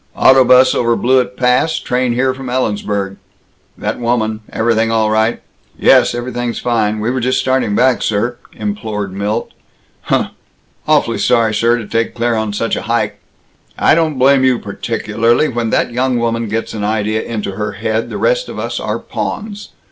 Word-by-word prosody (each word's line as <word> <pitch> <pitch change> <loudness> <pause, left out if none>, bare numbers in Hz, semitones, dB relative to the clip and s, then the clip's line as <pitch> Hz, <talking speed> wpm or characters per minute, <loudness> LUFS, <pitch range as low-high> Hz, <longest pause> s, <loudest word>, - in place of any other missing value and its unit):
"Auto 130 0 +6
'bus 125 +1 +5
over 120 -1 +1
Blewett 125 +1 +1
Pass, 125 +6 +2
train 125 -1 -1
here 130 +2 +1
from 130 0 -8
Ellensburg. 105 -5 -2 0.6
That - - -3
woman 115 -2 0
everything 115 0 +1
all 110 -1 +1
right?" 110 +2 +1 0.4
"Yes, - - +4
everything's 120 -1 -3
fine. 110 -3 0
We 110 +3 -1
were 130 - -1
just 130 +1 0
starting 130 -6 0
back, 130 +1 +3
sir," 120 +3 -1 0.2
implored 105 - -4
Milt. 100 +2 -2 0.5
"Huh!" - - +1 0.6
"Awfully - - +2
sorry, 115 -2 +2
sir, 115 +3 +2
to 115 - -6
take 115 +2 -1
Claire 120 0 0
on 110 -1 -1
such 115 +3 -1
a - - -3
hike 120 - 0 0.3
" - - -37
"I - - +4
don't 160 -3 +1
blame 135 +1 +4
you 130 -2 +3
particularly. 115 +4 0
When 120 -2 -2
that - - 0
young 125 +1 0
woman 115 -1 -1
gets 115 +2 -3
an 105 -2 -4
idea 110 +1 0
into 105 -3 -4
her 105 +2 -4
head, 110 +2 -2
the - - -5
rest - - 0
of - - -7
us - - -3
are - - -2
pawns. 210 -1 -5
115 Hz, 175 wpm, -16 LUFS, 110-125 Hz, 0.6 s, Auto